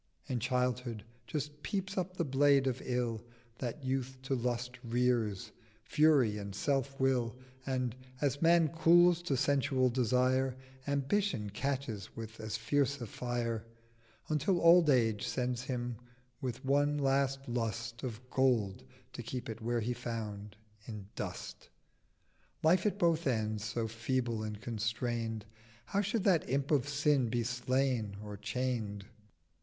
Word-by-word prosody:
In 125 -2 -2
Childhood 125 -2 -1 0.2
just 150 +4 -4
peeps 195 +3 -3
up 185 0 -2
the 170 - +1
Blade 140 0 +4
of 130 -2 -1
Ill, 120 -3 -1 0.4
That 125 +3 -4
Youth 130 0 -1
to 135 - -1
Lust 125 0 -2
rears, 120 -4 0 0.3
Fury, 135 -7 +4
and 100 -1 -6
Self 135 +3 0
will: 125 -3 +2 0.3
And, 125 -3 -1 0.2
as 140 -1 0
Man 165 -1 +5
cools 170 +2 +5
to 145 -6 0
sensual 135 -2 +2
Desire, 130 +2 +2 0.3
Ambition 140 - 0
catches 125 -3 -3
with 110 -1 -7
as 110 0 -3
fierce 140 +4 +1
a 120 - -4
Fire; 115 0 -2 0.6
920 - - -1
Until 165 +5 +2
Old 170 -1 +7
Age 115 -6 +3
sends 125 -1 -1
him 120 -2 -3 0.4
with 130 +1 -4
one 145 +2 +3
last 135 0 +1
Lust 115 -1 -3
Of 125 -1 -6
Gold, 115 - +2 0.3
to - - -5
keep 125 -2 -5
it 110 0 -6
where 120 +1 0
he 120 +3 -1
found—in 105 -2 -7
Dust. - - -6 0.9
Life 175 +5 +4
at 200 - -1
both 170 -5 +2
ends 110 -4 0
so 115 +1 -2
feeble 115 0 -1
and 105 -1 -4
constrain'd 115 0 -2 0.4
How 200 - 0
should 210 +1 -1
that 180 - +3
Imp 140 +2 0
of 145 -2 +2
Sin 145 -3 +2
be 120 0 0
slain 125 -3 0
or 105 -1 -6
chain'd? 105 -2 -2
125 Hz, 140 wpm, -33 LUFS, 115-140 Hz, 0.9 s, Old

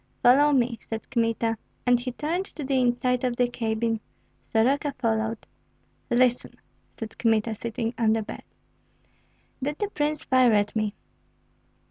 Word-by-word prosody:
"Follow 285 +4 +6
me," 245 -4 +1
said 225 -1 -6
Kmita. 230 -2 0 0.3
And 245 -1 +4
he 250 +1 -4
turned 330 +8 -2
to 305 - -8
the 265 -1 +1
inside 250 0 +1
of 250 -1 0
the 245 0 +2
cabin. 225 -1 -1 0.5
Soroka 275 +5 +2
followed. 225 -2 -1 0.6
"Listen," 245 0 +2 0.4
said 225 -1 -7
Kmita, 225 -1 +2
sitting 225 +1 -3
on 220 -2 +4
the 225 -1 0
bed. - - -8 1.2
"Did 290 +3 -2
the 415 - -2
prince 300 -1 -1
fire 255 -3 +4
at 205 0 +1
me?" 215 -1 -1
240 Hz, 140 wpm, -26 LUFS, 225-260 Hz, 1.2 s, Follow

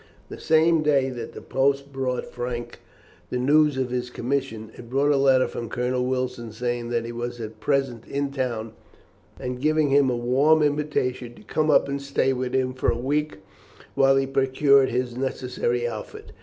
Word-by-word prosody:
The - - -8
same 160 +1 +3
day 140 -3 +2
that 120 -2 -7
the - - -10
post 140 +1 0
brought 130 -1 -2
Frank 120 -1 -5 0.5
the 125 - -2
news 145 +2 +3
of 130 -2 -1
his 125 0 -2
commission, 120 -4 -3
it 120 - -12
brought 140 +3 +2
a - - +3
letter 135 -2 +4
from 115 -2 -6
Colonel 125 +1 -1
Wilson 125 -3 -3
saying 120 +1 -3
that 120 -1 -1
he 120 - -5
was 120 +1 -5
at 110 -1 -7
present 135 -2 -1
in 140 0 -2
town, 120 -5 -3 0.7
and 125 0 -5
giving 155 0 +2
him 140 -1 +4
a 125 - 0
warm 140 +6 +3
invitation 145 -5 -1
to - - -16
come 155 0 0
up 145 - +4
and 140 0 -3
stay 140 -1 +1
with 125 0 -3
him 130 -1 +1
for 130 - 0
a - - 0
week, 145 -2 -2 0.5
while 135 0 +4
he 135 0 +2
procured 135 0 +3
his 125 0 -2
necessary 125 -2 -2
outfit. 110 -3 -8
130 Hz, 185 wpm, -24 LUFS, 120-140 Hz, 0.7 s, letter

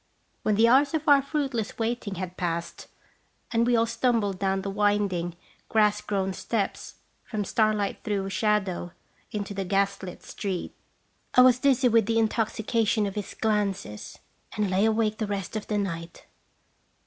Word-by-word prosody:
When 215 - +1
the 225 +3 +5
hours 275 +5 +4
of 310 -1 -3
our 285 -1 +7
fruitless 270 -6 -2
waiting 225 -3 -2
had 185 0 -5
passed, 170 -1 -3 0.6
and 235 0 +2
we 245 - +4
all 230 0 +3
stumbled 230 -4 0
down 195 -1 0
the 195 - -3
wind 205 -1 +2
ing, 175 0 -3 0.3
grass 210 -1 +3
grown 195 -2 -1
steps, 205 +1 -3 0.3
from 210 -3 -3
starlight 215 -2 0
through 200 -2 -1
shadow 190 -3 0 0.4
into 205 -1 -4
the 195 0 -2
gas 195 +1 0
lit 180 -2 -8
street, 190 -4 -4 0.6
I 250 - +8
was 250 -1 +6
dizzy 265 -2 +3
with 225 -2 +3
the 225 0 +1
intoxication 220 -1 +1
of 200 - -3
his 205 -1 -5
glances, 200 - -2 0.4
and 205 -3 0
lay 190 +3 +3
awake 220 -1 +1
the 215 - -1
rest 200 0 -4
of 215 - -4
the 210 - 0
night. 170 -4 -4
210 Hz, 160 wpm, -26 LUFS, 195-230 Hz, 0.6 s, I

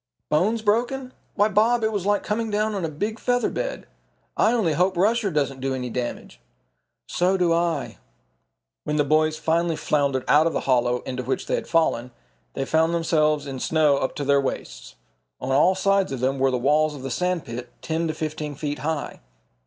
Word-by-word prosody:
"Bones 215 +9 +1
broken? 245 +5 0 0.2
Why, 205 +1 +4
Bob, 220 +3 +2
it 220 - +1
was 200 -3 -2
like 205 0 +2
coming 225 +1 -2
down 215 +1 0
on 195 -3 -3
a 165 - -1
big 210 +9 -4
feather 245 0 +1
bed. - - -4 0.5
I 220 - +3
only 215 -10 +1
hope 185 +2 +1
Rusher 215 +3 +2
doesn't 140 -5 -1
do 135 0 -1
any 125 -2 -4
damage." 120 - -5 0.7
"So 185 +2 +1
do 175 -2 +2
I." 165 -3 -1 0.8
When 150 - -2
the 150 - +3
boys 155 +2 +2
finally 165 +1 +1
floundered 140 -4 0
out 155 +2 +5
of 165 - -1
the - - -1
hollow 125 -1 +1
into 125 -1 -4
which 130 +1 -2
they - - -3
had - - -1
fallen, 145 -7 +1 0.5
they 135 - -2
found 160 +3 +2
themselves 155 -3 +1
in 135 -2 -6
snow 150 -1 +2
up 130 - -2
to 145 - -3
their 140 0 +4
waists. 135 - -5 0.4
On - - -3
all 160 +8 +4
sides 195 -2 +1
of 135 - -3
them 130 +2 0
were 135 0 +3
the 130 - 0
walls 150 +4 +2
of 135 - -9
the 135 - -4
sand 180 +4 -1
pit, 120 0 -7
ten 165 +1 -1
to 155 - -3
fifteen 155 -1 -4
feet 145 0 -4
high. 155 -1 -3
155 Hz, 200 wpm, -24 LUFS, 140-195 Hz, 0.8 s, out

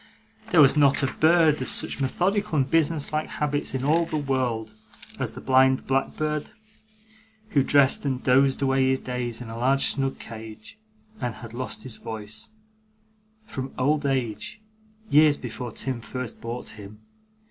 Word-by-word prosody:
There 175 -7 +6
was 140 0 +6
not 140 -2 +4
a 135 - 0
bird 160 -2 +4
of 130 - -4
such - - -3
methodical 185 +7 0
and 135 -2 +2
business 160 0 +1
like 155 0 -1
habits 145 -2 -1
in 130 - -2
all 160 +4 +3
the 155 - -2
world, 125 -6 -1 0.5
as - - -3
the - - -8
blind 130 0 +3
blackbird, 150 +3 -1 1.0
who 145 -8 +3
dreamed 135 0 +4
and 130 -3 -2
dozed 135 +1 +3
away 135 -1 +3
his 130 0 +1
days 125 -2 -4
in 120 - -7
a 115 - -6
large 135 +3 +2
snug 135 -1 0
cage, 110 - -10 0.4
and 120 -3 -3
had 115 0 -10
lost 130 +2 -4
his 130 -4 -9
voice, 110 - -7 1.0
from 130 -8 -6
old 145 +2 +1
age, 130 - -2 0.5
years 150 0 +6
before 120 0 -6
Tim 130 +1 -3
first 125 0 -7
bought 120 +2 -5
him. 105 0 -12
130 Hz, 160 wpm, -25 LUFS, 120-145 Hz, 1.0 s, There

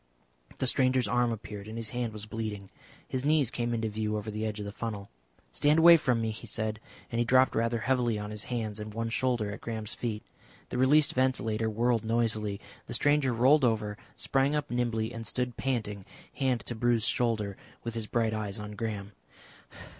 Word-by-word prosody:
The - - -1
stranger's 130 -2 +3
arm 120 +2 +2
appeared, 105 -2 -6
and 110 +1 -6
his 115 -2 -4
hand 120 -2 -2
was 105 -1 -7
bleeding. 105 -3 -5 0.4
His 130 0 -2
knees 150 -4 +3
came 120 -1 -1
into 115 -1 0
view 105 0 -2
over 105 +1 -4
the 110 +1 -2
edge 105 0 -4
of 105 - -4
the 100 - -5
funnel. 105 -2 -5 0.4
"Stand 150 +2 +3
away 170 +1 +9
from 125 -7 +2
me," 110 -1 0
he 110 +2 -9
said, 110 0 -3 0.3
and 115 - -1
he - - +4
dropped 130 +2 +4
rather 115 0 0
heavily 120 -2 +1
on 105 0 -5
his 105 -1 -3
hands 110 -4 -3
and 105 0 -7
one 115 0 -1
shoulder 120 -3 0
at 105 - -8
Graham's 110 -2 -4
feet. 110 -3 -3 0.5
The 125 - -2
released 145 +3 +5
ventilator 115 -4 +1
whirled 115 +1 +1
noisily. 110 -3 0 0.3
The - - -3
stranger 145 -2 +3
rolled 130 +5 +5
over, 110 -3 +1 0.2
sprang 135 +2 +1
up 145 -3 -2
nimbly 120 -2 0
and 115 -1 -4
stood 125 0 -1
panting, 110 -7 -2 0.3
hand 130 -4 0
to - - -6
a - - -9
bruised 120 0 +2
shoulder, 110 -4 +1
and 95 - -15 0.2
with 115 - -4
his 115 -2 -4
bright 115 -1 +1
eyes 105 -2 -3
on 105 -1 -6
Graham. 105 -1 -4
115 Hz, 200 wpm, -29 LUFS, 105-125 Hz, 0.5 s, away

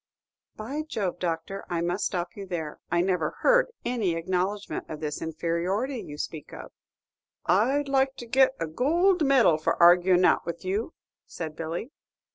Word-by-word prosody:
"By 265 +8 -4
Jove, 215 - -3
Doctor, 175 +3 -3
I 170 -2 -1
must 175 +4 -1
stop 175 -2 -4
you 200 -1 -7
there; 160 -4 -4
I 175 +1 +2
never 180 -4 0
heard - - +5 0.2
any 220 -9 0
acknowledgment 185 +4 -2
of 155 - -6
this 150 -1 -4
inferiority 180 - -2
you 145 - -9
speak 150 0 -6
of." 65 -2 -9 0.7
"I'd 260 +10 +2
like 270 0 +2
to 240 - -8
get 265 +3 +3
a - - -1
goold 335 - +2
medal 255 - +4
for 155 - 0
arguin' 175 +1 +6
it - - +5
out - - +3
with 170 +2 -6
you," 205 - -2 0.3
said 160 -2 -6
Billy. 165 - -5
185 Hz, 165 wpm, -27 LUFS, 165-250 Hz, 0.7 s, arguin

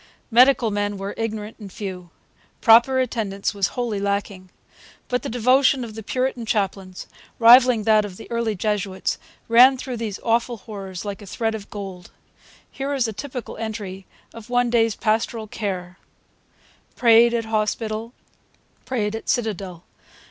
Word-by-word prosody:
Medical 245 -1 +5
men 205 0 -2
were 195 +1 -5
ignorant 220 -1 -5
and 200 -3 -10
few. 180 -3 -7 0.5
Proper 240 +3 +6
attendance 215 -6 -2
was 200 -2 +1
wholly 235 -5 -1
lacking. 200 -2 -3 0.6
But 250 0 0
the - - -5
devotion 255 +3 +3
of 225 -2 -7
the 220 - -7
Puritan 255 +2 -2
chaplains, 195 -3 -2 0.3
rivalling 240 -1 +7
that 215 0 +4
of 195 -3 -8
the - - -10
early 230 -2 -1
Jesuits, 200 -1 -2 0.3
ran 250 +3 +7
through 255 -1 -5
those 220 -3 -4
awful 235 +1 +1
horrors 195 -3 -8
like 200 0 -5
a 205 - -11
thread 225 +3 -2
of 210 -2 -7
gold. 190 -4 -8 0.6
Here 275 +1 -4
is 255 -4 +1
a 220 - -4
typical 250 +1 -7
entry 205 -4 -6 0.3
of 230 0 -11
one 245 -1 +1
day's 225 -3 +2
pastoral 220 +1 -1
care: 185 -4 -5 1.0
'Prayed 235 0 +5
at 230 -1 -1
Hospital. 220 +1 -2 0.7
Prayed 220 -4 -2
at 225 - -7
Citadel. 195 -7 -2
220 Hz, 150 wpm, -22 LUFS, 200-235 Hz, 1.0 s, rivalling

